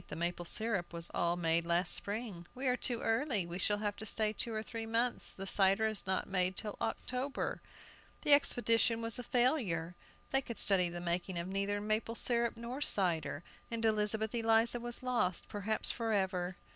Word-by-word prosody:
The - - -6
maple 175 +1 -3
syrup 200 -2 -2
was 170 0 -4
all 170 0 +1
made 170 -1 +1
last 170 +1 +2
spring." 205 -5 -2
"We 260 +2 -5
are 250 -1 +3
too 245 -2 -3
early; 225 - 0
we 170 +1 -6
shall 205 +2 +1
have 205 -1 -2
to 220 - -6
stay 215 0 0
two 230 - -1
or 215 -1 -3
three 225 0 -6
months, 235 +2 -1
the 195 - -6
cider 195 +2 +3
is 215 -3 0
not 190 - 0
made 185 -1 +1
till 210 -2 -4
October." 255 +4 -3 0.6
The 295 - +7
expedition 230 -4 +3
was 230 +1 -3
a - - -5
failure! 235 - +1 0.4
They 270 - +3
could 235 -3 -7
study 185 -3 +5
the 175 0 -6
making 175 +1 -2
of 170 +1 -3
neither 200 +1 -1
maple 215 +2 -2
syrup 235 -1 +1
nor 240 +4 -6
cider, 170 - +1 0.3
and 230 -1 -2
Elizabeth 215 0 +2
Eliza 230 +1 +2
was 240 +1 -3
lost, 240 -8 -1
perhaps 210 +1 +1
forever! 190 -5 -1
215 Hz, 185 wpm, -33 LUFS, 180-230 Hz, 0.6 s, The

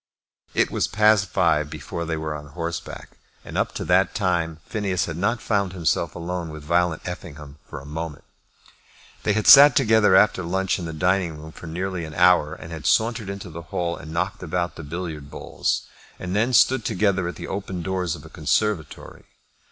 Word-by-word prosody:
It - - +2
was - - 0
past 105 -2 +3
five 75 -4 +1
before 75 +2 -6
they 80 0 -2
were 80 0 -3
on 75 -1 -8
horseback, 85 +2 -6 0.3
and - - -9
up - - 0
to - - -4
that 95 +2 +2
time 85 -5 0
Phineas 95 -6 -1
had 80 - -5
not 105 +7 -1
found 100 -4 0
himself 85 -4 -1
alone 85 0 -4
with 75 -1 -9
Violet 85 +1 +1
Effingham 75 -5 -8
for - - -7
a 70 - -13
moment. 75 0 -6 1.0
They 105 - +1
had 110 +1 -1
sat 140 -1 +10
together 110 -6 +4
after 95 -1 +4
lunch 95 +3 -1
in 85 - -5
the 80 - -4
dining 90 0 0
room 80 +1 -10
for 85 - -11
nearly 90 +2 -3
an 80 -1 -8
hour, 85 -4 +4
and 80 - -11
had 80 -5 -5
sauntered 110 - +1
into 100 -2 -7
the 85 +2 -7
hall 85 -1 -2
and 80 - -10
knocked 85 +3 -2
about 90 0 -2
the - - -8
billiard 80 -2 -6
balls, - - -2 0.4
and 95 +1 -4
then 115 +5 +2
stood 125 +2 +4
together 100 -5 +1
at 90 - -5
the - - -7
open 95 -3 -4
doors 90 -2 -2
of 75 - -12
a - - -11
conservatory. 80 +1 -2
90 Hz, 190 wpm, -23 LUFS, 80-95 Hz, 1.0 s, sat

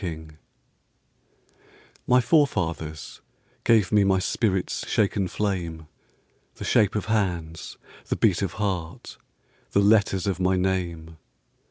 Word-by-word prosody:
Driftwood 80 -3 -6 1.7
My 125 0 +5
forefathers 85 - 0 0.4
gave 110 -6 +3
me 105 -1 +4
My 95 -1 +3
spirit's 95 0 -1
shaken 100 -2 +1
flame, 85 -5 -3 0.7
The - - -8
shape 105 -1 +2
of 105 - -1
hands, 90 -7 -2 0.3
the - - -1
beat 100 -5 +2
of 95 - -2
heart, 90 -5 -4 0.6
The - - +4
letters 100 -2 +3
of 95 -3 -1
my 95 0 +2
name. 85 -4 -2
95 Hz, 115 wpm, -25 LUFS, 85-105 Hz, 1.7 s, My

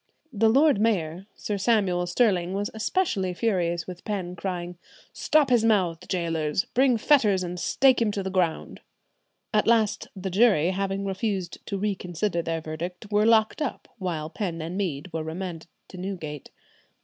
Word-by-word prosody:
The 220 +1 +3
lord 275 -1 +4
mayor, 185 -4 0
Sir 205 -2 -3
Samuel 190 -5 +2
Stirling, 185 -2 +1
was 205 +1 -2
especially 220 - -1
furious 175 -6 0
with 180 -1 -9
Penn, 185 -4 -3
crying, 175 -1 -5 0.3
"Stop 300 -4 +2
his 240 -3 +4
mouth; 185 -6 +1
gaoler, 165 -4 -1 0.2
bring 255 -1 +4
fetters 215 -8 +3
and 180 0 -5
stake 260 +8 +3
him 225 - +3
to 200 - -2
the 190 - -3
ground." 180 -4 -1 0.7
At 210 - +2
last 220 -3 +2
the 190 0 -5
jury, 190 -5 +4
having 195 +1 -2
refused 195 -2 -3
to 200 - -2
reconsider 190 -2 -2
their 165 0 -3
verdict, 175 +6 -6
were 210 +1 +3
locked 225 +5 +3
up; 290 - -3
while 160 -4 -3
Penn 175 -5 -3
and 165 +3 -5
Mead 180 -4 -3
were 165 - -2
remanded 165 +1 -6 0.2
to 185 - -10
Newgate. 170 -7 -6
190 Hz, 160 wpm, -26 LUFS, 175-215 Hz, 0.7 s, lord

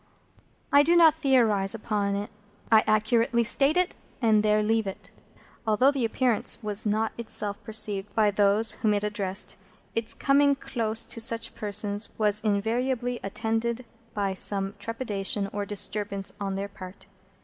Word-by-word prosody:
I 285 - +7
do 335 +4 +3
not 330 -3 +7
theorise 230 -10 +2
upon 205 -2 -2
it; 205 +1 -5 0.4
I 220 -1 +6
accurately 230 +2 +2
state 275 +7 +2
it, 365 0 +1 0.3
and 220 -3 +3
there 210 0 +2
leave 220 0 0
it. 195 - -8 0.6
Although 250 +6 +4
the 270 -4 -1
Appearance 235 0 0
was 210 0 -2
not 220 +1 0
itself 205 -3 -3
perceived 210 -2 +1
by 215 -2 +3
those 205 +2 +3
whom 210 -1 0
it 205 - -2
addressed, 205 -2 -2 0.4
its 230 0 -2
coming 280 0 +3
close 225 -4 -1
to 230 - -6
such 230 0 -1
persons 205 0 -2
was 210 -1 +2
invariably 235 +4 -1
attended 225 +4 -2 0.3
by 200 -2 -1
some 195 +1 0
trepidation 210 -4 -2
or 205 -1 -3
disturbance 200 -1 -2
on 195 -1 -2
their 195 +1 -3
part. 185 -1 -12
215 Hz, 150 wpm, -26 LUFS, 205-235 Hz, 0.6 s, I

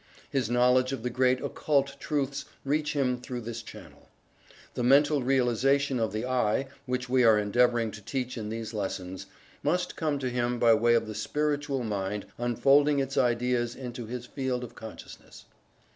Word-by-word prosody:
His 135 -6 0
knowledge 125 +2 +3
of 125 -4 -5
the 125 - -2
great 130 +1 +2
occult 140 -2 0
truths 140 -2 -2 0.2
reach 150 +2 0
him 130 -4 0
through 125 -1 -5
this 115 0 -6
channel. 110 - -13 0.6
The - - -3
mental 145 +3 +4
realization 135 +1 +2
of 110 -1 0
the 110 +3 -3
"I," 130 0 0 0.2
which 125 0 -2
we 130 0 +3
are 110 -2 +6
endeavoring 115 +2 +2
to 110 - -10
teach 130 +3 -3
in 110 -3 -5
these 115 0 -5
lessons, 95 -2 -4 0.3
must 180 +4 0
come 155 -3 -1
to 130 -2 -3
him 120 0 0
by 115 -1 +5
way 120 +2 +4
of 115 - +2
the 110 - -6
Spiritual 145 +4 -1
Mind 100 -1 -3
unfolding 135 +5 +3
its 135 0 -1
ideas 120 0 +1
into 120 -3 -7
his 125 +1 -5
field 130 -1 -3
of 120 - -8
consciousness. 110 -1 -11
125 Hz, 170 wpm, -28 LUFS, 115-135 Hz, 0.6 s, are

